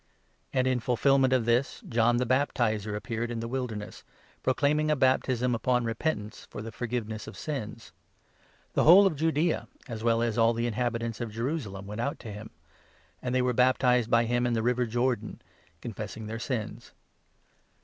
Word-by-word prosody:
'" - - -41
And 130 -1 +1
in 130 -1 +2
fulfilment 130 +2 +3
of 130 -3 +2
this, 120 +3 +1
John 120 0 +3
the 125 - +1
Baptizer 115 -5 0
appeared 115 +2 -3
in 120 -1 -3
the 115 - -4
4 115 - -6
Wilderness, 120 -6 -4 0.4
proclaiming 150 +3 +1
a 150 - +3
baptism 130 -2 +2
upon 125 +1 +1
repentance, 115 -2 -3
for 105 - -7
the 115 - -6
forgiveness 110 -3 -4
of - - -9
sins. 115 -6 -5 0.8
The - - +2
whole 185 +5 +9
of 190 - +2
Judaea, 160 +2 0 0.2
as 115 -3 -6
well 115 0 +2
as 115 -1 0
all 115 +1 +5
the 115 - -1
5 120 - +1
inhabitants 115 0 -2
of 120 - -3
Jerusalem, 115 -5 -3
went 105 +3 -5
out 140 +4 -2
to 110 - -7
him; 105 +2 -8 0.7
and 125 0 -2
they 130 - +3
were 125 0 +1
baptized 125 -1 +3
by 115 0 +4
him 120 +1 +1
in 120 - 0
the 115 -1 0
river 125 0 +1
Jordan, 120 -1 -1 0.4
confessing 110 0 -6
their 110 +1 -5
sins. 120 -4 -4
120 Hz, 180 wpm, -28 LUFS, 115-130 Hz, 0.8 s, whole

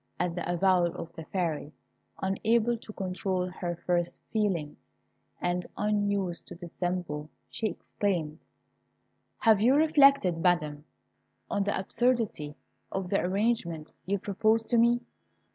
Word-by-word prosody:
At 180 -1 0
the 175 0 -2
avowal 175 -1 +3
of 165 - -7
the 160 - -8
Fairy, 160 -5 -2 0.5
unable 225 +5 +2
to 225 -1 -10
control 185 -1 -2
her 175 -1 -3
first 175 -1 0
feelings, 190 -9 0 0.6
and 175 0 -1
unused 200 -4 0
to - - -8
dissemble, 175 -3 -4 0.2
she 220 - -1
exclaimed, 175 -7 -2 1.0
"Have 220 -3 +4
you 250 +5 +5
reflected, 280 - +5
Madam, 155 -4 +1 0.7
on 200 -1 +1
the 205 - 0
absurdity 220 -8 0 0.4
of 190 -2 -3
the 195 - +3
arrangement 185 -5 -1 0.2
you 200 +1 +1
propose 215 +3 +1
to 235 +1 +2
me!" 235 +1 +4
190 Hz, 125 wpm, -29 LUFS, 175-215 Hz, 1.0 s, you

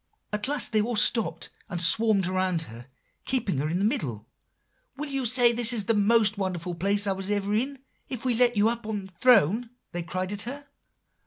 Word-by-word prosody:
"At 210 +3 -2
last 285 -3 +1
they 215 -2 +2
all 235 +2 -3
stopped 205 -6 +1 0.2
and 175 -3 -4
swarmed 200 +3 +3
around 185 -2 -1
her, 120 -2 -13 0.4
keeping 215 - -1
her 150 +2 -2
in 170 - -2
the 195 - -2
middle. 125 - -3 0.7
'Will 295 +1 -5
you 270 -3 -1
say 240 0 +5
"This 235 0 +6
is 230 -4 +1
the 230 - +1
most 210 0 +2
wonderful 180 -2 -3
place 200 +4 +1
I 200 - 0
was 190 0 -4
ever 205 0 -1
in," 265 +6 -1 0.3
if 250 -1 -6
we 250 - +2
let 240 -1 +3
you 205 - +3
get 230 +2 +1
up 235 - -18
in 205 -3 -4
the 190 - -15
throne?' 225 - +3 0.2
they 175 - -4
cried 185 +2 -4
at 205 - -5
her. 280 +6 -7
210 Hz, 215 wpm, -25 LUFS, 185-235 Hz, 0.7 s, This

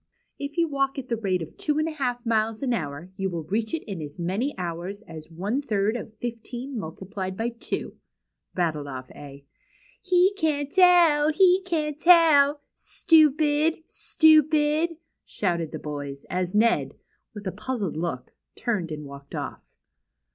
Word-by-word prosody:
If 280 +2 -6
you 335 -1 +3
walk 275 -2 -1
at 260 -2 -6
the 235 - +1
rate 190 -6 -1
of 160 - -11
two 300 0 -1
and 310 +1 +1
a - - -2
half 250 -5 -3
miles 225 +1 0
an 250 -2 +1
hour; 160 -2 -4
you 195 0 -1
will 170 -3 -4
reach 215 +7 -2
it 325 - -2
in 195 -6 -6
as 145 +1 -8
many 195 +11 -2
hours 180 +3 -5
as 160 -4 -11
one 200 +11 -2
third 215 -4 0
of 220 -2 -7
fifteen 240 +3 -6
multiplied 190 0 -5
by 230 +1 -1
twO;" 230 - -5 0.6
rattled 155 -5 -1
off 130 -2 -7
A. 140 -1 -12 0.6
He 370 0 +3
can't 290 -3 0
tell! 345 -5 +5
he 370 +3 +5
can't 305 -4 -1
tell! 310 -4 +6
Stupid! 310 0 +3
stupid! 310 +1 +3 0.2
" - - -57
shouted 170 -5 -2
the - - -5
boyS; 145 -2 -6
as 180 +1 -2
Ned; 230 +2 +2 0.4
with 205 0 -8
a 190 - -1
puzzled 210 -3 -3
look; 155 -6 -4 0.2
turned 190 -9 -2
and 150 -1 -6
walked 140 0 -10
off. - - -5
230 Hz, 160 wpm, -25 LUFS, -, 0.6 s, tell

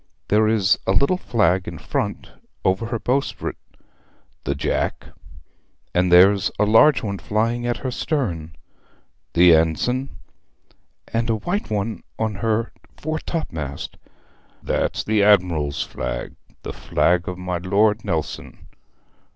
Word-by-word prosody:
'There 110 +1 +4
is 105 -3 +3
a - - +3
little 140 +6 +3
flag 95 - +1
in 85 - -6
front - - -3 0.3
over 95 +5 +1
her 115 0 -2
bowsprit.' 130 +5 -2 0.9
'The 70 - -1
jack.' - - -2 0.9
'And 90 0 +2
there's 95 +2 +6
a 105 - +3
large 120 +7 +5
one 100 -3 -3
flying 115 +3 -1
at 120 - 0
her 130 - -1
stern.' 85 - -2 0.8
'The 85 0 +7
ensign.' 125 - +1 1.0
'And 115 +1 0
a 115 - +3
white 175 - -3
one 105 -2 -2 0.2
on 110 -1 -1
her 115 0 0 0.3
fore 155 +1 -3
topmast.' 80 - -5 0.7
'That's - - -1
the 110 -1 +1
admiral's 85 -8 +3
flag, - - -5 0.3
the - - -5
flag 85 0 +1
of 90 - -5
my 90 -1 -3
Lord 105 +4 +2
Nelson. 85 -7 -4
105 Hz, 125 wpm, -22 LUFS, 90-115 Hz, 1.0 s, The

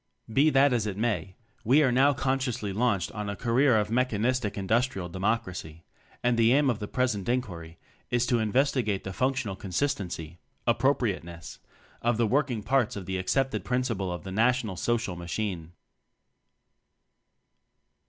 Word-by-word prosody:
Be 145 +5 +5
that 140 -1 +4
as 115 -3 0
it 100 -2 -4
may, 105 -4 -1 0.3
we 135 +7 +5
are 130 - +3
now 135 +4 +5
con 135 0 0
sciously 115 -6 -3
launched 100 -4 0
on 105 -1 -4
a 100 - -3
career 125 +2 +3
of 105 0 0
mechanistic 120 -2 0
Industrial 100 -1 0
Democracy; 90 -4 -3 0.4
and 120 -1 +2
the 115 +1 +5
aim 140 -1 +4
of 115 - -4
the 105 - -4
present 120 -5 -1
inquiry 85 -10 -3 0.3
is 120 0 +1
to 120 0 +2
investigate 115 -2 +1
the 95 - -5
functional 130 -3 -1
con 95 - -9
sistency 90 - -2 0.3
(appropriateness) 115 - -1 0.4
of 120 -1 +1
the 115 - +2
working 125 -2 0
parts 130 0 +1
to 100 - -4
the 95 +1 -3
accepted 110 +1 0
prin 125 +5 0
ciple 100 -7 -2
of 85 -3 -5
the 95 - -7
National 115 -1 +1
Social 115 0 -1
Machine. 85 -1 -4
115 Hz, 155 wpm, -28 LUFS, 95-125 Hz, 0.4 s, Be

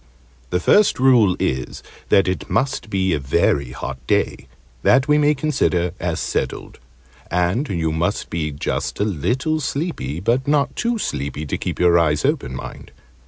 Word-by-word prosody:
The 90 - 0
first 205 - +4
rule 120 -8 +5
is, 65 -1 -2 0.3
that 95 - +4
it 85 -5 -3
must 130 -4 -1
be 95 -3 +1
a - - 0
very 65 0 +1
hot 70 0 -6
day - - 0 0.3
that 130 +2 +4
we 150 0 +4
may 150 0 +3
consider 130 - 0
as 85 -1 -2
settled: - - -3 0.5
and 90 +11 0
you 80 -4 -1
must 80 +2 -2
be 80 -2 -2
just 70 - -3
a 105 - +2
little 125 - -1
sleepy 140 - -3
but 120 +8 0
not 145 -1 +1
too 235 0 0
sleepy 70 - -3
to 70 - -2
keep - - -4
your 85 -1 +5
eyes 75 -2 +1
open, 65 - -1
mind. - - -8
90 Hz, 165 wpm, -21 LUFS, -, 0.5 s, rule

